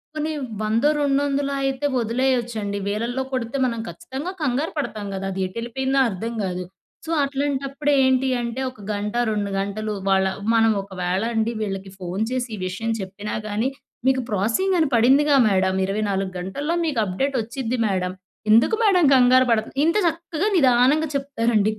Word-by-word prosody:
పోనీ 310 +1 -2 0.3
వందో, 225 +6 +2
రెండొందలో 280 0 +1
అయితే 270 +1 -1
వదిలేయొచ్చండి. 235 -3 -1
వేలల్లో 235 +5 -1
కొడితే 255 +1 -2
మనం 230 -2 -2
ఖచ్చితంగా 265 - -6
కంగారు 285 +3 0
పడతాం 215 -8 -3
గదా! 195 0 -3
అదెటెళ్లిపోయిందో 235 +8 -1
అర్థం 225 +4 -4
కాదు. 180 -1 -3 0.4
సో, - - -8
అట్లాంటప్పుడు 280 +1 -1
ఏంటి 260 0 +3
అంటే, 235 +2 -3
ఒక 210 -5 -15
గంట, 205 +2 -3 0.2
2 205 -1 -2
గంటలు 210 +2 -3 0.2
వాళ్ళ 190 0 +3 0.3
మనం 225 -1 +4
ఒకవేళ 185 0 -2
అండి 225 +1 +1
వీళ్ళకి 195 -2 -4
ఫోన్ 185 +4 -2
చేసి 255 -1 -2
ఈ - - -9
విషయం 225 +5 -3
చెప్పినా 195 +2 -6
కానీ, 215 +5 0 0.4
"మీకు 260 -1 +3
ప్రోసెసింగ్ 230 - +1
అని 315 - +3
పడిందిగా 275 +5 +5
మేడం, 190 -1 +2
24 195 -1 -1
గంటల్లో 280 - -2
మీకు 285 -8 0
అప్‌డేట్ 265 +9 -1
వచ్చిద్ది 240 +1 -3
మేడం, 185 -2 -1 0.4
ఎందుకు 230 - +5
మేడం 365 -6 +4
కంగారు 255 0 +5
పడతారు?" 220 +1 0
ఇంత 335 +5 +2
చక్కగా 335 +3 -2
నిదానంగా 270 +3 +4
చెప్తారండి. 230 -6 +1
235 Hz, 145 wpm, -23 LUFS, 205-275 Hz, 0.4 s, పడిందిగా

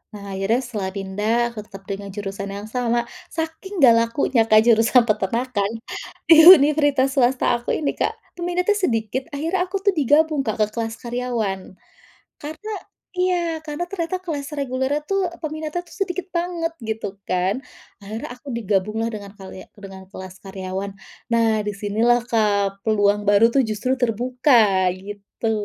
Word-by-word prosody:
Nah, 200 -1 -8
akhirnya 195 +5 0
setelah 210 -6 -4
pindah, 210 +5 0
aku 230 - -8
tetap 195 -2 -12
dengan 200 0 -6
jurusan 200 -1 -5
yang 200 +1 -6
sama, 240 -1 0 0.2
saking 320 +2 -4
enggak 235 -3 +8
lakunya, 230 -2 +1
Kak, 215 0 +6
jurusan 230 +1 +5
peternakan 220 0 0 0.6
di 320 0 +9
universitas 290 -5 +6
swasta 250 -2 +2
aku 240 - -2
ini, 295 - -1
Kak, - - -2 0.2
peminatnya 355 +3 0
sedikit, 250 - -1
akhirnya 345 +5 -1
aku 385 +1 -4
tuh 400 - +4
digabung, 300 -3 +2
Kak, 215 0 +1
ke - - +3
kelas 225 -1 -3
karyawan. 235 -6 -3 0.6
Karena 315 +9 -7 0.5
iya, 350 -3 +1
karena 300 +3 -3
ternyata 365 0 -3
kelas 300 -4 -5
regulernya 275 +1 -1
tuh 390 +4 0
e - - -12
peminatnya 310 +2 -4
itu 355 - -19
sedikit 365 0 -4
banget 340 -1 -2
gitu 220 -3 -5
kan. 185 +4 0 0.4
Akhirnya 215 +3 -7
aku 250 0 -8
digabung 215 0 -1
lah 230 - -1
dengan 205 -2 -8
kalia 190 -2 -11
dengan 190 -2 -11
kelas 185 -1 -10
karyawan. 190 0 -5 0.4
Nah, 230 -1 +3 0.2
di 210 - -1
sinilah, 220 +4 +1
Kak, 200 -3 +1
peluang 205 -1 +2
baru 205 +3 +5
itu 235 -4 +1
justru 255 +5 -1
terbuka, 235 -4 +3
gitu. 205 +3 -6
235 Hz, 150 wpm, -22 LUFS, 205-300 Hz, 0.6 s, di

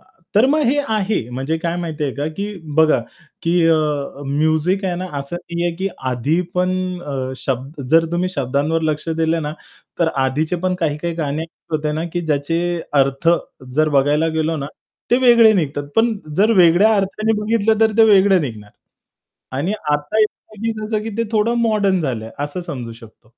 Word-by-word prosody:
अ, - - -28 0.3
तर 220 +5 +6
मग 300 +3 +2
हे 280 +4 +2
आहे 210 - 0
म्हणजे 135 +6 -2
काय 170 0 -2
माहिती 160 -3 -3
आहे 135 - -3
का 145 +2 -2
की 205 +1 -4 0.2
बघा 160 -5 +5 0.4
की 165 - 0 0.2
अ, 165 - +5
अ, 145 -2 -2
म्युझिक 155 +7 +1
आहे 180 - 0
ना 185 +1 -4
असं 140 +5 -5
नाहीये 175 0 -2
की 190 +2 -1 0.2
आधी 140 +8 0
पण 180 0 +1 0.3
अ, 130 -3 -4
शब्द 135 +3 -4
जर 165 0 +5
तुम्ही 180 +1 0
शब्दांवर 140 +4 0
लक्ष 155 0 -2
दिलं 165 0 0
ना, 150 0 -3 0.5
तर 165 - +4 0.2
आधीचे 155 +6 0
पण 185 0 +1
काही-काही 165 +1 -1
गाणी 155 -1 -2 0.3
होते 155 -1 -1
ना 155 +2 -2
की 175 - -1
ज्याचे 150 +2 0 0.4
अर्थ 135 +4 -1 0.5
जर 155 0 +4
बघायला 150 +4 +2
गेलो 160 +1 0
ना, 140 - -4 0.4
ते 240 - +5
वेगळे 235 -2 +7
निघतात. 145 -5 -1
पण 225 0 +3 0.2
जर 215 +3 +5
वेगळ्या 180 +5 +6
अर्थाने 200 +3 0
बघितलं 220 0 +1
तर 220 -1 +4
ते 225 - +8
वेगळं 195 -2 +5
निघणार. 110 -6 -6 0.9
आणि 165 +9 -1 0.2
आता 150 +7 -1 0.4
असे 220 +1 -3
आहे 210 - -1
की 220 -2 -5
ते - - +3
थोडं 220 +2 +2
मॉडर्न 205 -4 +2
झालंय 115 -6 -3
असं 145 +5 -3
समजू 120 -4 -5
शकतो. 115 0 -17
165 Hz, 175 wpm, -19 LUFS, 145-195 Hz, 0.9 s, ते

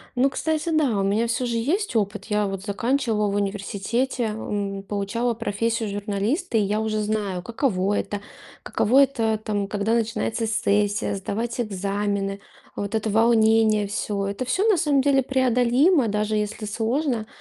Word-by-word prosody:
Ну, 260 +3 +3
кстати, 315 +3 -1
да, 285 -10 +2
у - - +1
меня 210 +4 +1
всё 240 +2 -1
же 235 -1 -1
есть 320 - -1
опыт. 205 -1 -1
Я 210 -2 0
вот 195 -1 -5
заканчивала 220 +1 0
в - - -2
университете, 205 +5 -1
м, 205 -2 -3
получала 210 +4 -1
профессию 230 0 -1
журналиста, 210 - -1
и - - +4
я 205 +2 0
уже 220 -1 -1
знаю, 205 -4 -2
каково 205 -4 0
это. 205 - -4 0.4
Каково 265 +6 +4
это, 225 -5 0
там, 205 -2 -1
когда 210 +2 -1
начинается 225 0 -1
сессия, 205 -1 +1
сдавать 225 +5 -3
экзамены. 200 -1 -2 0.4
Вот 205 +2 -3
это 220 0 -1
волнение 220 -1 +4
всё- 200 -1 -2
это 200 +6 -3
всё, 390 - +1
на 415 - +4
самом 295 -4 +2
деле, 275 0 +3
преодолимо, 255 +3 +3
даже 210 +1 0
если 210 +1 -2
сложно. 230 +2 -1
220 Hz, 155 wpm, -24 LUFS, 205-245 Hz, 0.4 s, и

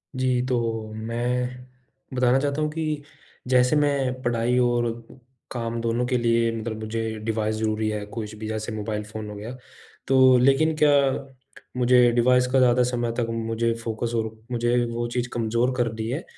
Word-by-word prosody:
जी, 130 -1 +1
तो 115 -3 -2
मैं 125 +3 -3 0.5
बताना 125 +1 +3
चाहता 145 +2 -1
हूँ 150 - +1
कि 155 -2 -3 0.4
जैसे 125 +2 +4
मैं 140 -3 +1
पढ़ाई 120 0 +1
और 120 -1 +2 0.6
काम 115 -1 -3
दोनों 115 +1 0
के 125 0 +1
लिए 115 -1 +2
मतलब 110 -1 -4
मुझे 110 0 -3
डिवाइस 110 -1 -1
ज़रूरी 110 0 -1
है। 105 -1 -3
कुछ 110 0 -6
भी 110 0 -6
जैसे 110 +1 -4
मोबाइल 105 0 -3
फ़ोन 105 0 -7
हो 105 - -7
गया। 110 +5 -7 0.5
तो 130 -1 +6
लेकिन 135 +5 +3
क्या 150 -1 +6 0.9
मुझे 125 -1 +5
डिवाइस 125 +1 +3
का 135 - +4
ज़्यादा 125 -1 +4
समय 120 -1 -1
तक 115 - 0
मुझे 115 0 -1
फ़ोकस 115 +1 -3
और 110 -1 -1 0.2
मुझे 120 0 +1 0.2
वो 120 0 -2
चीज़ 120 -1 -1
कमज़ोर 115 +2 0
कर 120 -3 +1
दी 110 0 -4
है। 140 +7 -3
120 Hz, 170 wpm, -24 LUFS, 110-125 Hz, 0.9 s, तो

